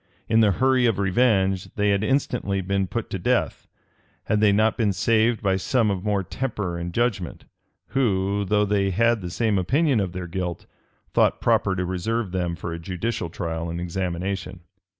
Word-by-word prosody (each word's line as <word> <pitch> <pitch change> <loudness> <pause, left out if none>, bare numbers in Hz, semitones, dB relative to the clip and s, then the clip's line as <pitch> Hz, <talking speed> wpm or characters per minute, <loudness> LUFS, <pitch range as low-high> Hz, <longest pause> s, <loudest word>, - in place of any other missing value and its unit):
In 110 - +3
the 105 -3 +4
hurry 130 +2 +3
of 115 - +1
revenge, 95 -2 +1
they 105 0 +2
had 100 +1 +1
instantly 125 -6 0
been 95 +1 -1
put - - -4
to - - -3
death, - - 0 0.6
had 105 - 0
they 105 -1 +5
not 110 +2 +3
been 105 -4 +1
saved 110 +4 +2
by 95 -1 +2
some 110 +3 +1
of 95 -2 -3
more 105 -2 0
temper 105 -4 -3
and 85 0 -4
judgment, 100 -4 -2 0.4
who, 100 -6 +1
though 105 +1 +2
they 100 -1 +1
had 115 +3 +2
the 90 - -5
same 105 +1 +1
opinion 135 - +2
of 95 -3 -2
their 90 -1 -5
guilt, 90 -1 -4 0.5
thought - - +3
proper 95 - +2
to 90 -1 -1
reserve 95 +3 -2
them 90 -2 -1
for 85 +1 -5
a 85 - -5
judicial 90 +3 -3
trial 80 -1 -4
and 85 +1 -4
examination. 90 +1 -3
100 Hz, 180 wpm, -24 LUFS, 90-110 Hz, 0.6 s, they